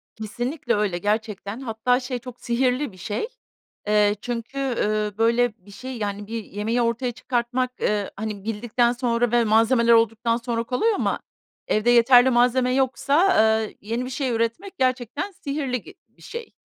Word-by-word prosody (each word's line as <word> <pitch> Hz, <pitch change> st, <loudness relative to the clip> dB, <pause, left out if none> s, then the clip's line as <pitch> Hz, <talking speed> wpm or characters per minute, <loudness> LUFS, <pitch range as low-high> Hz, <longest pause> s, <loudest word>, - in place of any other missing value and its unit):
Kesinlikle 240 Hz, +4 st, -3 dB
öyle, 205 Hz, -4 st, 0 dB
gerçekten. 210 Hz, +2 st, -2 dB
Hatta, 245 Hz, 0 st, 0 dB
şey, 250 Hz, -1 st, -4 dB
çok 250 Hz, 0 st, -11 dB
sihirli 250 Hz, +2 st, 0 dB
bir 185 Hz, -, -17 dB
şey. 205 Hz, -, -3 dB, 0.6 s
Eee, 210 Hz, -1 st, +3 dB
çünkü, 240 Hz, +2 st, -5 dB
ııı, 215 Hz, -6 st, -1 dB
böyle, 235 Hz, +1 st, +2 dB
bir 205 Hz, -, -14 dB
şey, 255 Hz, +5 st, -7 dB
yani, 205 Hz, -1 st, -4 dB
bir 225 Hz, 0 st, -4 dB
yemeği 220 Hz, +5 st, -2 dB
ortaya 240 Hz, +2 st, 0 dB
çıkartmak, 250 Hz, +1 st, -2 dB
ııı, 205 Hz, -1 st, 0 dB
hani, 210 Hz, -1 st, -5 dB
bildikten 235 Hz, +2 st, 0 dB
sonra 240 Hz, -1 st, 0 dB
ve 240 Hz, -1 st, +4 dB
malzemeler 230 Hz, +2 st, +4 dB
olduktan 230 Hz, +1 st, +2 dB
sonra 235 Hz, -1 st, -2 dB
kolay 265 Hz, -, +1 dB
ama -, -, -1 dB, 0.5 s
evde 215 Hz, +3 st, +1 dB
yeterli 245 Hz, +2 st, +6 dB
malzeme 250 Hz, +1 st, +3 dB
yoksa, 280 Hz, +7 st, +2 dB, 0.3 s
eee, 215 Hz, -, -7 dB
yeni 230 Hz, +4 st, -3 dB
bir -, -, -6 dB
şey 260 Hz, 0 st, -2 dB
üretmek 230 Hz, -, -2 dB
gerçekten 255 Hz, -, -1 dB
sihirli 275 Hz, -, -3 dB
gi 385 Hz, -, -14 dB
bir -, -, -26 dB
şey. 470 Hz, -1 st, -8 dB
235 Hz, 160 wpm, -23 LUFS, 220-255 Hz, 0.6 s, yeterli